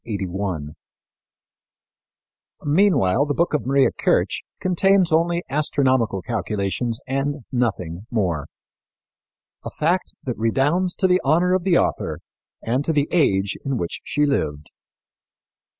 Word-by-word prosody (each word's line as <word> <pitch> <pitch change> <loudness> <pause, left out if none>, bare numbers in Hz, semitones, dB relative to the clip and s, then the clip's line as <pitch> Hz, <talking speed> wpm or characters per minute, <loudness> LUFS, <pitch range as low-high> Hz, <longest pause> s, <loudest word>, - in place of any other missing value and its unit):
Similarly, 95 -7 -4 1.9
the 145 - +3
book 170 -1 +1
of 150 - -1
Maria 135 0 +3
Kirch - - 0 0.2
contains 185 0 +2
only 170 +2 +2
astronomical 130 -8 +1
calculations 110 +2 -2
and 135 +1 -2
nothing 100 -6 -2
more 90 -10 -1 1.2
a - - -5
fact 175 +4 -1
that 125 -4 -4
redounds 145 +11 +1
to 190 - +2
the 180 0 +3
honor 170 +6 +3
of 185 -1 +1
the 180 -3 +4
author - - -1 0.5
and 125 +5 0
to 160 - 0
the 145 -1 +1
age 100 - +2
in 135 -2 -1
which 85 -6 -4
she 150 0 +1
lived. 75 - -1
135 Hz, 120 wpm, -22 LUFS, 100-165 Hz, 1.9 s, the